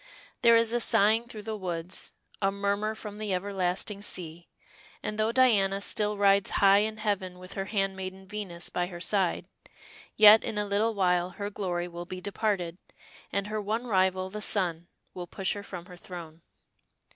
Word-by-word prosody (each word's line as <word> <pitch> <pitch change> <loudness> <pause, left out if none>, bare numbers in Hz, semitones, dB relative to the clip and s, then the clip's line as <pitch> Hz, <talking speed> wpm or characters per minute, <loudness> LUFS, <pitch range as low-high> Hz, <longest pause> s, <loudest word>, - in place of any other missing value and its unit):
There 235 -2 +7
is 230 0 +2
a 240 - +2
sighing 220 +1 +4
through 215 -3 -8
the 220 0 -4
woods, 175 -3 -5 0.3
a 195 0 +2
murmur 200 +2 -1
from 210 -1 -8
the 215 -2 -2
everlasting 195 +1 -2
sea, 175 -4 -5 0.5
and 210 0 -4
though 215 +1 +2
Diana 210 -6 +3
still 210 +1 0
rides 200 -1 +4
high 200 0 +6
in 215 +1 -1
heaven 190 -4 -2
with 185 0 -10
her 195 - -3
handmaiden 190 -2 -3
Venus 185 -4 -5
by 175 0 -1
her 175 -2 -8
side, 185 0 0 0.7
yet 215 +1 +9
in 215 - -3
a 210 - 0
little 210 +3 +1
while 180 -2 +2
her 200 +3 -5
glory 175 -4 -2
will 175 0 -7
be 185 +1 -6
departed, 190 -3 -2 0.5
and 200 -1 -1
her 215 +1 -3
one 220 +4 -2
rival, 185 -3 +1
the 210 +1 -5
sun, 175 -5 -1 0.3
will 180 -1 -6
push 190 +2 -1
her 205 - -6
from 180 -3 -8
her 180 -1 -12
throne. 170 -3 -10
195 Hz, 175 wpm, -28 LUFS, 180-210 Hz, 0.7 s, yet